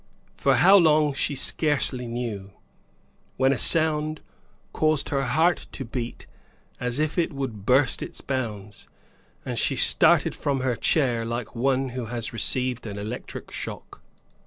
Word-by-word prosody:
For - - +2
how 195 +3 +7
long, 155 -4 +4
she 140 +1 -1
scarcely 135 -3 0
knew, 115 -5 -5 0.8
when 130 +1 +3
a - - -3
sound 155 -1 +1 0.5
caused 155 -1 +1
her 135 -1 0
heart 160 +7 +1
to 135 - -6
beat 120 0 -5 0.5
as 125 0 -2
if 155 +3 0
it 170 - +1
would 125 -8 -5
burst 130 +1 +3
its - - -7
bounds, 105 -6 -5 0.6
and - - -3
she - - +1
started - - +4
from 140 -2 -1
her 130 -2 0
chair 120 -4 +1
like 115 0 -4
one 130 +2 +1
who 125 -2 -5
has 115 0 -4
received 125 +2 -1
an 100 -1 -6
electric 105 +4 -7
shock. - - -8
130 Hz, 145 wpm, -25 LUFS, 115-150 Hz, 0.8 s, how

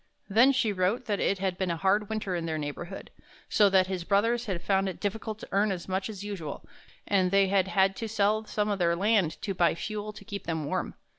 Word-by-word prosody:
Then 230 +7 +5
she 235 -5 +1
wrote 195 +7 0
that 205 -2 -1
it 200 - +1
had 185 -1 -2
been 190 -2 0
a 170 - -1
hard 200 +3 +1
winter 215 -4 -2
in 170 -1 -3
their 160 -1 -2
neighborhood, 150 +3 -6 0.4
so 205 -2 +5
that 190 -1 +4
his 185 -2 -4
brothers 230 +6 +1
had 180 -4 -3
found 195 -1 +1
it 185 - -7
difficult 215 +1 -3
to - - -10
earn 200 +1 +2
as 180 -3 -5
much 190 +2 -2
as 205 -2 -7
usual, 185 -8 -6 0.4
and 190 -2 +2
they 195 0 +3
had 195 -1 +2
had 190 0 +2
to 225 - -4
sell 215 0 +1
some 210 0 -1
of 200 -1 -1
their 170 -1 +2
land 195 -3 +1
to 195 - -1
buy 175 -3 +2
fuel 210 +3 -4
to 200 - -12
keep 200 -1 -7
them 160 -3 -2
warm. 145 - -2
195 Hz, 235 wpm, -28 LUFS, 185-210 Hz, 0.4 s, Then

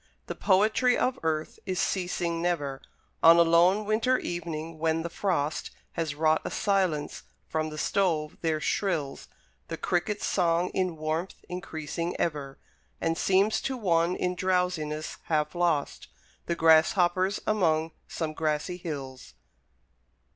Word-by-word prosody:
The - - -4
poetry 220 +6 +3
of 260 0 0
earth 160 -1 -2
is 185 -1 -1
ceasing 175 -2 -1
never: 145 -6 -1 0.4
On 165 +1 +8
a 170 - +7
lone 175 +5 +4
winter 225 +5 +2
evening, 165 -4 -5
when 160 0 +1
the 170 - -5
frost 160 -7 -1 0.2
Has 160 -3 -3
wrought 155 +1 +2
a - - -3
silence, 185 -7 0 0.3
from 155 0 -1
the 155 - -8
stove 160 -4 0
there 160 -2 0
shrills 155 -5 -2 0.4
The - - -5
Cricket's 205 +4 -1
song, 175 -1 +1
in 185 -3 -1
warmth 155 +4 -3
increasing 170 -1 -4
ever, 145 -4 -2 0.4
And 165 0 0
seems 195 +4 +2
to 265 -1 -2
one 175 -4 +2
in 180 0 -1
drowsiness 180 -5 -1
half 150 -2 0
lost, 170 -5 0 0.4
The 170 - 0
Grasshopper's 175 +3 +4
among 165 -6 +1 0.2
some 160 -2 -3
grassy 155 +3 -1
hills. 140 -7 -7
170 Hz, 135 wpm, -28 LUFS, 155-185 Hz, 0.4 s, On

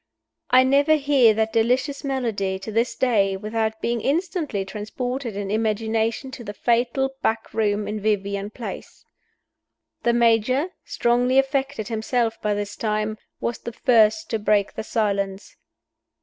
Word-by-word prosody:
I 255 +1 +6
never 280 +4 +4
hear 275 -7 +4
that 220 0 0
delicious 250 +6 +1
melody, 230 -9 -1
to 190 +3 -7
this 230 +3 0
day, 200 -7 +2
without 220 +2 -2
being 235 -1 -1
instantly 305 - -1
transported 235 +4 -4
in 200 -1 -4
imagination 220 +3 -1
to 260 -3 -8
the 205 -2 -7
fatal 245 +4 +1
back 225 - -1
room 210 -1 0
in 210 0 -3
Vivian 200 -1 -1
Place. 230 +2 -8 1.0
The 235 - +2
Major 235 - +3 0.2
strongly 245 +2 +1
affected 270 -4 0
himself 225 0 -1
by 210 -1 0
this 205 0 -4
time 215 0 -2 0.2
was 235 - -3
the 235 - -7
first 235 +6 +3
to 225 - 0
break 205 -1 +1
the - - -4
silence. 200 -3 -2
225 Hz, 140 wpm, -23 LUFS, 210-255 Hz, 1.0 s, I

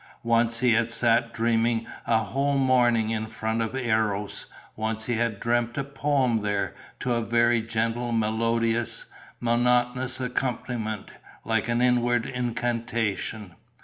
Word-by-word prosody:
Once 115 0 +2
he 125 -2 +4
had 115 +1 +2
sat 115 0 +2
dreaming 115 0 +1 0.2
a 115 - +4
whole 140 +5 0
morning 120 -4 +3
in 110 0 -2
front 110 +1 -2
of 110 - -1
the 130 -1 -3
Eros; 105 -3 0 0.3
once 110 0 -2
he 120 - -1
had 115 -3 0
dreamt 120 +1 0
a 140 - 0
poem 135 -4 +1
there, 105 -1 -1 0.3
to 125 - 0
a 115 - +1
very 120 0 +3
gentle, 115 +2 -1
melodious, 115 +1 0 0.3
monotonous 125 +2 +1
accompaniment, 125 -4 -3 0.3
like 115 0 0
an 120 +1 +1
inward 120 -1 +2
incantation. 115 -5 -2
115 Hz, 135 wpm, -26 LUFS, 110-120 Hz, 0.3 s, he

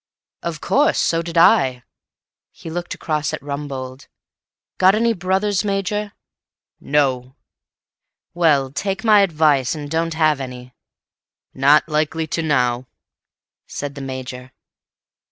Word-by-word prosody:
"Of 165 -3 -5
course. 300 +3 +2
So 165 0 +1
did 170 0 -5
I." 130 -6 +4 0.7
He 165 - -10
looked 175 +1 -4
across 155 -1 -2
at - - -5
Rumbold. 140 -2 -6 0.7
"Got 190 +2 +5
any 230 +1 +2
brothers, 190 +2 0
Major?" 205 +1 -2 0.7
"No." 130 -3 0 1.0
"Well, 150 -6 +2
take 195 - -3
my 215 -2 +6
advice, 155 -7 +2
and 145 -1 -7
don't 165 0 -1
have 155 -3 +2
any." 125 -1 -8 0.8
"Not 140 +4 +4
likely 155 +1 -1
to 165 - -3
now," 125 -5 0 0.8
said 145 -1 -5
the 140 - -8
Major. 130 -1 -7
155 Hz, 120 wpm, -20 LUFS, 135-175 Hz, 1.0 s, my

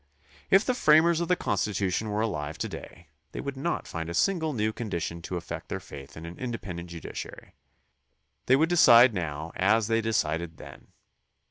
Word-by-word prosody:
If 195 +3 +5
the 255 - +1
framers 160 -5 +4
of 170 - -1
the 180 - +3
Constitution 100 - -1
were 105 +1 -1
alive 75 -9 -3
to - - -2
day, 85 -3 -10 0.2
they - - -5
would 140 -1 -4
not 145 +6 -2
find 80 -1 -5
a 85 - -4
single 165 - +1
new 110 -4 -1
condition 85 -7 -4
to 90 +2 -4
affect 85 0 -7
their - - -3
faith 70 0 -11
in 80 - -8
an 85 +1 -9
independent 100 -9 -5
judici 85 -1 -7
ary. - - -14 0.9
They 130 - +6
would 155 +4 +3
decide 125 -8 +7
now 80 -3 -4
as 105 +4 +3
they 115 +1 +1
decided 85 -7 -1
then. - - -12
105 Hz, 185 wpm, -27 LUFS, 85-130 Hz, 0.9 s, decide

